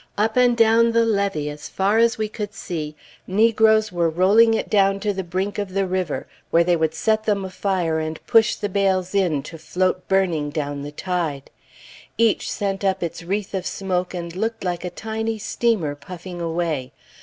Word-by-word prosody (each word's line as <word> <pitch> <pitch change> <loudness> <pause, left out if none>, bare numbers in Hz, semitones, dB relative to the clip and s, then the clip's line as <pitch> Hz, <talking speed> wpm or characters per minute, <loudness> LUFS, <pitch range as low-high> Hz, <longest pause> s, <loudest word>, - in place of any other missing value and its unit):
Up 220 +2 +1
and 245 -1 +4
down 230 0 +4
the 230 0 +4
levee, 200 -9 0
as 150 0 -7
far 200 +3 +1
as 230 0 +3
we 215 -1 -1
could 210 -1 -6
see, 155 -6 -5 0.3
negroes 220 +1 +3
were 170 -2 +1
rolling 205 +7 +5
it - - -2
down 195 -1 +3
to 210 0 0
the 190 0 -3
brink 190 +4 -3
of 200 -2 -4
the 195 0 +2
river 185 -4 -2 0.2
where 170 - +4
they 175 0 +3
would 160 -1 0
set 215 +5 +1
them 200 -3 0
afire 185 -4 -1
and 155 0 -4
push 225 -1 +4
the 205 - -3
bales 190 -2 0
in 175 -8 +1
to 165 +2 -9
float 185 +3 -1
burning 175 -6 +1
down 145 -2 -3
the 145 +1 -6
tide. 160 -4 -3 0.7
Each 230 -1 +2
sent 195 -1 -2
up 190 -2 +1
its 170 - -4
wreath 195 +4 -3
of 190 -2 -2
smoke 185 -2 -2
and 170 -1 -6
looked 225 +4 -2
like 175 -2 -2
a 180 - -3
tiny 220 +4 -3
steamer 210 -7 0
puffing 175 +4 -9
away. 165 -6 -2
190 Hz, 190 wpm, -22 LUFS, 170-210 Hz, 0.7 s, rolling